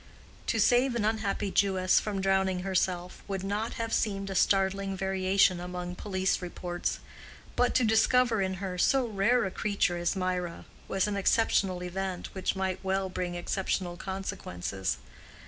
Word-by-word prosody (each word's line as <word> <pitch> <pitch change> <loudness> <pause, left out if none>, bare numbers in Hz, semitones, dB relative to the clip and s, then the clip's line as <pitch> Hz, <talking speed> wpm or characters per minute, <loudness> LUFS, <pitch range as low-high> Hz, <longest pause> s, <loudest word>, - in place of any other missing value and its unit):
To 225 - +1
save 245 +3 +4
an 220 -3 0
unhappy 215 -2 -1
Jewess 190 -2 +3
from 200 -2 -3
drowning 190 -1 +2
herself, 180 -1 -1
would 195 -2 -3
not 205 +3 -2
have 230 -1 -3
seemed 195 -2 0
a - - -2
startling 195 +1 +2
variation 190 -1 +2
among 180 0 -5
police 190 0 -1
reports; 175 0 -3 0.6
but 245 0 +2
to 255 - +4
discover 225 0 +3
in 190 0 0
her 185 -1 -4
so 265 +6 +3
rare 225 +3 +2
a 190 - -3
creature 200 -3 0
as 175 +3 0
Mirah, 180 -2 -2 0.2
was 195 0 +1
an 205 -1 -2
exceptional 195 -3 +2
event 185 0 -4
which 190 0 -1
might 190 0 -2
well 190 0 0
bring 180 -1 -3
exceptional 180 0 -2
consequences. 100 - -4
190 Hz, 150 wpm, -29 LUFS, 185-205 Hz, 0.6 s, save